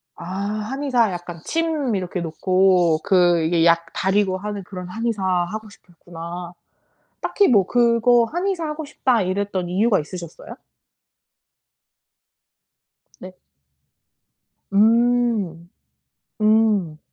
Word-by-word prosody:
아 -, -, -11 dB
한의사 215 Hz, +6 st, -1 dB
약간 175 Hz, -2 st, -7 dB
침 315 Hz, -7 st, -1 dB
이렇게 180 Hz, -1 st, -3 dB
놓고 180 Hz, 0 st, +2 dB
그 175 Hz, -3 st, +3 dB
이게 165 Hz, +1 st, +2 dB
약 170 Hz, 0 st, +4 dB
달이고 190 Hz, 0 st, +1 dB
하는 205 Hz, 0 st, -6 dB
그런 180 Hz, -1 st, -8 dB
한의사 225 Hz, -1 st, -3 dB
하고 190 Hz, +4 st, -2 dB
싶으셨구나. 175 Hz, -1 st, -10 dB, 0.7 s
딱히 405 Hz, -, +2 dB
뭐 200 Hz, -7 st, +3 dB
그거 235 Hz, 0 st, +3 dB
'한의사 355 Hz, 0 st, -2 dB
하고 305 Hz, 0 st, -5 dB
싶다.' 260 Hz, -5 st, 0 dB
이랬던 185 Hz, -1 st, -2 dB
이유가 200 Hz, +3 st, +2 dB
있으셨어요? 170 Hz, +1 st, -9 dB, 2.7 s
네. 185 Hz, 0 st, -11 dB, 1.4 s
음 225 Hz, -5 st, +2 dB, 0.7 s
음. 215 Hz, -7 st, +2 dB
195 Hz, 205 characters per minute, -21 LUFS, 175-235 Hz, 2.7 s, 약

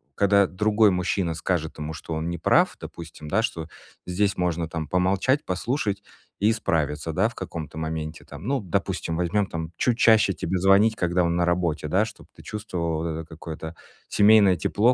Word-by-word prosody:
когда 100 Hz, 0 st, +4 dB
другой 105 Hz, +2 st, +3 dB
мужчина 90 Hz, -1 st, 0 dB
скажет 80 Hz, -1 st, -2 dB
ему, 75 Hz, +1 st, -4 dB
что 80 Hz, +2 st, -7 dB
он 80 Hz, +2 st, -2 dB
неправ, 85 Hz, -, +2 dB
допустим, 80 Hz, -2 st, -9 dB
да, 105 Hz, +7 st, +2 dB
что 85 Hz, -8 st, -3 dB, 0.4 s
здесь 100 Hz, +2 st, 0 dB
можно 85 Hz, -2 st, 0 dB
там 80 Hz, -2 st, -4 dB
помолчать, 95 Hz, -, +1 dB
послушать 100 Hz, +1 st, -2 dB, 0.4 s
и 105 Hz, +2 st, +4 dB
справиться, 80 Hz, -7 st, -1 dB
да, 100 Hz, +7 st, +2 dB
в 120 Hz, -, -15 dB
каком-то 80 Hz, -1 st, -6 dB
моменте 80 Hz, 0 st, -4 dB
там. 75 Hz, +6 st, -10 dB
Ну, 135 Hz, -3 st, 0 dB
допустим, 85 Hz, -2 st, -2 dB
возьмём 95 Hz, +3 st, +1 dB
там- 80 Hz, -1 st, -5 dB
чуть 120 Hz, -2 st, +1 dB
чаще 110 Hz, -5 st, +5 dB
тебе 95 Hz, 0 st, -2 dB
звонить, 100 Hz, +4 st, +5 dB
когда 90 Hz, 0 st, +1 dB
он 85 Hz, 0 st, +1 dB
на 85 Hz, 0 st, +2 dB
работе, 85 Hz, -3 st, 0 dB
да, 95 Hz, +7 st, +2 dB
чтоб 115 Hz, -, -12 dB
ты -, -, -14 dB
чувствовала 85 Hz, -7 st, -3 dB
вот 85 Hz, -, -2 dB
это -, -, -10 dB
какое-то 80 Hz, 0 st, -8 dB, 0.3 s
семейное 100 Hz, -3 st, +5 dB
тепло, 115 Hz, +8 st, +2 dB
90 Hz, 175 wpm, -25 LUFS, 80-105 Hz, 0.4 s, чаще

